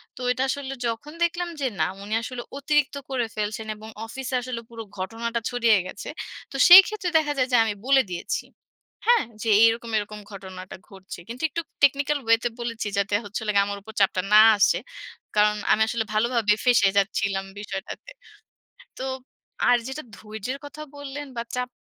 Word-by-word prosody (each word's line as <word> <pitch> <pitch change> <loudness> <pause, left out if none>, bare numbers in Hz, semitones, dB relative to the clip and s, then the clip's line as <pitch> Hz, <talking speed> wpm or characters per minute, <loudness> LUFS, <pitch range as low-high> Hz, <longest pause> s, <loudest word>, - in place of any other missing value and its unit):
তো - - -13
এইটা 255 +1 0
আসলে 270 0 -3
যখন 235 +6 -5
দেখলাম 345 +1 -1
যে 270 - +1
না, - - +3 0.2
উনি 210 +2 -5
আসলে 245 +1 -6 0.2
অতিরিক্ত 285 0 +1
করে 255 -3 0
ফেলছেন 215 +1 -3
এবং 215 +1 -11 0.2
অফিসে 260 +3 -5
আসলে 245 -1 -5
পুরো 230 -1 -8
ঘটনাটা 230 +5 -3
ছড়িয়ে 235 -3 +3
গেছে। 200 - -8 0.4
তো - - -9
সেইক্ষেত্রে 380 +2 +8
দেখা 300 -2 +1
যায় 255 -1 +2
যে, 245 - +5
আমি 220 -2 -1
বলে 270 0 +5
দিয়েছি। 175 - -3 0.6
হ্যাঁ? 480 -1 +5 0.2
যে, 225 - -1
"এইরকম, 230 +1 +3
এরকম 210 0 -4
ঘটনাটা 185 -2 -9
ঘটছে।" 190 -2 -10
কিন্তু 240 +2 -8
একটু 335 - -3 0.2
টেকনিক্যাল 285 +1 +3
ওয়েতে 230 +1 +3
বলেছি 230 -2 -3
যাতে 200 +1 +1
হচ্ছিলো 210 +1 -4
গিয়া 200 0 +4
আমার 200 0 -4
উপর 220 +2 -12
চাপটা 190 -1 +3
না 215 - +10 0.2
আসে। 205 - +4 0.6
কারণ 210 0 +4 0.2
আমি 220 - +3
আসলে 220 0 -1
ভালোভাবে 225 -1 +2
ফেঁসে 235 -5 +5
যাচ্ছিলাম 195 0 0
বিষয়টাতে। 205 - -7 0.9
তো - - -4 0.7
আর 245 - +5
যেটা 280 +3 -5
ধৈর্যের 220 +5 -6
কথা 295 +1 -9
বললেন 285 0 -7
বা, - - 0
চাপ 250 0 -2
230 Hz, 170 wpm, -24 LUFS, 210-270 Hz, 0.9 s, না